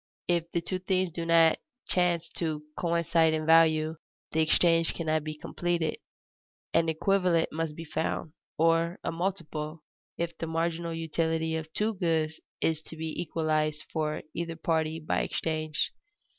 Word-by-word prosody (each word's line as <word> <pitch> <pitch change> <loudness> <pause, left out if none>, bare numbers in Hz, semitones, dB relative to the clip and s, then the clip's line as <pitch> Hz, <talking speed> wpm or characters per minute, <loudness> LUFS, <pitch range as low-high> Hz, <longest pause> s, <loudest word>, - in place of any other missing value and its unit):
If 170 -1 +1
the 170 - 0
two 185 +2 -3
things 185 -1 +1
do 165 +1 -4
not 165 -1 +5 0.3
chance 175 -2 +2
to 155 -3 -2
coincide 170 -1 +2
in 155 0 -2
value, 160 -1 +5 0.3
the 160 - +2
exchange 165 +1 +3
cannot 155 -2 0
be 155 0 -5
completed. 170 -1 -1 0.8
An 165 0 +3
equivalent 180 0 +2
must 160 -1 -2
be 165 - -7
found, 155 0 -2 0.2
or 165 +2 +3
a - - -1
multiple, 165 -3 -3 0.3
if 170 0 -2
the 165 - -2
marginal 165 +1 -1
utility 160 0 0
of 160 0 -4
two 215 +1 +1
goods 160 -4 0 0.2
is 160 -1 +1
to 160 - -11
be 160 0 -3
equalized 155 -2 0
for 155 -1 -1
either 170 -1 -3
party 160 -1 0
by 155 - 0
exchange. 155 -1 -1
165 Hz, 145 wpm, -29 LUFS, 155-170 Hz, 0.8 s, not